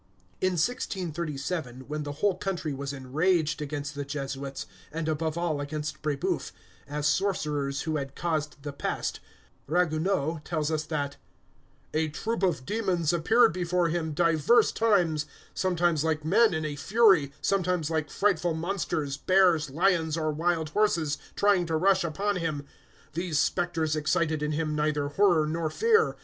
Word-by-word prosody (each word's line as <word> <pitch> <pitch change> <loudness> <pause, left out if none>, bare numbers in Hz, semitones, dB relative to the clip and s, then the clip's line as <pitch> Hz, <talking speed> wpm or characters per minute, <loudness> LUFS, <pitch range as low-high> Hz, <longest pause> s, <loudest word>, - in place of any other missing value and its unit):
In 185 0 +2
1637, 165 - -2
when 150 +3 -5
the 145 -1 -4
whole 200 +7 +1
country 180 -7 -3
was 140 +1 -4
enraged 150 +4 0
against 145 0 -4
the 145 -1 -4
Jesuits, 140 -1 -5 0.3
and 160 +1 -3
above 160 +1 -1
all 165 -4 -1
against 150 +1 -4
Brébeuf, 150 -2 -1 0.4
as 145 +1 -3
sorcerers 150 -6 0
who 155 -1 -1
had 140 -1 -5
caused 155 -4 -2
the 145 -1 -5
pest, - - -3 0.5
Ragueneau 160 -1 +1
tells 160 -2 -1
us 155 -1 -1
that 145 -3 -3 0.8
"a 155 +1 +1
troop 225 +10 -3
of 175 -9 +1
demons 185 -6 0
appeared 225 +6 +4
before 180 -1 +1
him 160 -2 -2
divers 165 +7 +4
times, 175 -9 +2 0.3
sometimes 175 -4 +1
like 155 -1 -1
men 210 +3 +4
in 160 0 -2
a 150 -1 -3
fury, 190 -3 +4
sometimes 180 -5 0
like 155 -2 -1
frightful 175 -5 +1
monsters, 160 -5 -2
bears, 180 -3 +3
lions, 165 0 +1
or 155 -1 0
wild 160 0 0
horses, 165 -7 +1 0.2
trying 200 -4 +3
to 160 -1 0
rush 190 +3 +3
upon 195 +5 -1
him. 155 -4 -3 0.5
These 170 -1 -1
spectres 160 0 +1
excited 155 0 0
in 150 0 -1
him 155 0 -1
neither 150 -1 0
horror 170 -1 +3
nor 160 +1 -1
fear. 450 - +3
160 Hz, 150 wpm, -28 LUFS, 150-180 Hz, 0.8 s, appeared